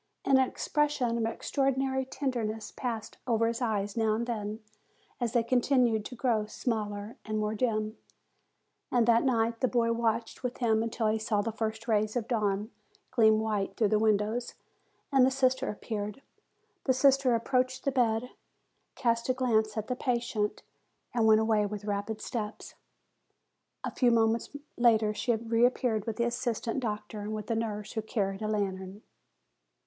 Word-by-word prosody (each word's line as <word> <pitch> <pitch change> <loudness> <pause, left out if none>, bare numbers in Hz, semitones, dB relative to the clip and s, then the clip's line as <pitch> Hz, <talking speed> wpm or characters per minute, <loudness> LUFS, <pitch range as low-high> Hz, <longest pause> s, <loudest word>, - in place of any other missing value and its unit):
And 270 -1 +5
an 260 - +4
expression 290 -6 0
of 230 -1 0
extraordinary 265 +2 0
tenderness 230 -6 -3
passed 225 -4 -4
over 230 -1 +2
his 230 +2 -1
eyes 210 -4 -1
now 220 -2 +2
and 235 +2 -1
then, 215 -2 -4 0.6
as 240 -2 -1
they 235 - +3
continued 245 -3 +2
to 250 - -7
grow 230 -4 +1
smaller 210 -2 -3
and 215 -1 -3
more 215 0 0
dim. 215 -1 -1 0.9
And 240 -2 +3
that 230 0 +5
night 230 -3 +1
the 255 - +2
boy 235 -2 +2
watched 230 0 -1
with 250 -1 -3
him 220 -3 +2
until 230 0 -2
he 215 +1 +2
saw 215 -2 0
the 225 - -2
first 220 +1 -4
rays 215 0 +1
of 235 -2 -1
dawn 210 -2 0 0.4
gleam 220 -1 +5
white 210 -3 -1
through 215 -3 +3
the 215 - +3
windows, 215 +2 +1 0.6
and 270 -2 +5
the 260 - +6
sister 260 0 +1
ap 210 - -6
peared. 210 +2 -4 0.6
The 260 - +4
sister 265 -1 +4
approached 255 +2 0
the 275 - +2
bed, 240 -2 +1 0.6
cast 235 -2 0
a 255 - +3
glance 220 -4 +1
at 215 - -1
the 250 - -2
patient, 235 -5 -1 0.5
and 240 - +1
then 220 - +4
went 220 0 +6
away 215 -2 +2
with 205 0 -6
rapid 205 +1 -3
steps. 215 -3 -5 1.1
A - - -2
few 250 - +3
moments 225 0 +2 0.3
later 225 -3 +4
she 235 +2 0
reappeared 230 0 +1
with 225 - -2
the 235 - +1
assist 240 -1 -2
ant 230 - 0
doctor, 210 -3 -4
and 210 +1 -4
with 215 +1 -5
a - - +2
nurse, 215 -2 -3
who 220 - -2
carried 200 -2 -2
a 215 - -1
lantern. 195 -1 -3
225 Hz, 170 wpm, -30 LUFS, 215-245 Hz, 1.1 s, the